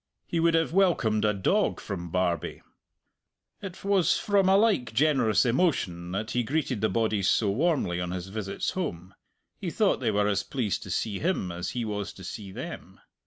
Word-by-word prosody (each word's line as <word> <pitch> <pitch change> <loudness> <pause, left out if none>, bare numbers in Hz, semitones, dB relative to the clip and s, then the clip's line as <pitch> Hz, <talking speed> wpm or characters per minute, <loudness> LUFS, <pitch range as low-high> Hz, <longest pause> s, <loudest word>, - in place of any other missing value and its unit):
He 170 - -2
would 165 0 +3
have 165 0 +1
welcomed 170 - +2
a 105 - +4
dog 185 - +1
from 85 -4 -5
Barbie. 90 -1 -1 1.0
It 190 -3 -8
was 195 -3 +3
from 200 -2 +2
a 195 - +6
like 200 - +2
generous 130 -5 +3
emotion 115 - 0
that 110 +4 -3
he 125 - +1
greeted 130 -3 -1
the 110 - +2
bodies 110 -4 +1
so 105 -3 +2
warmly 130 - 0
on 90 - -3
his 90 +1 -5
visits 100 -1 -3
home 95 - -4 0.5
he 185 - -3
thought 205 +3 +2
they 120 - 0
were 105 -1 +2
as 100 -2 +1
pleased 115 -7 -2
to - - -9
see 100 +3 -2
him 165 - -1
as 85 +1 -4
he 120 - -1
was 105 -2 -4
to 95 - -12
see 100 +1 -7
them. - - -8
110 Hz, 185 wpm, -27 LUFS, -, 1.0 s, a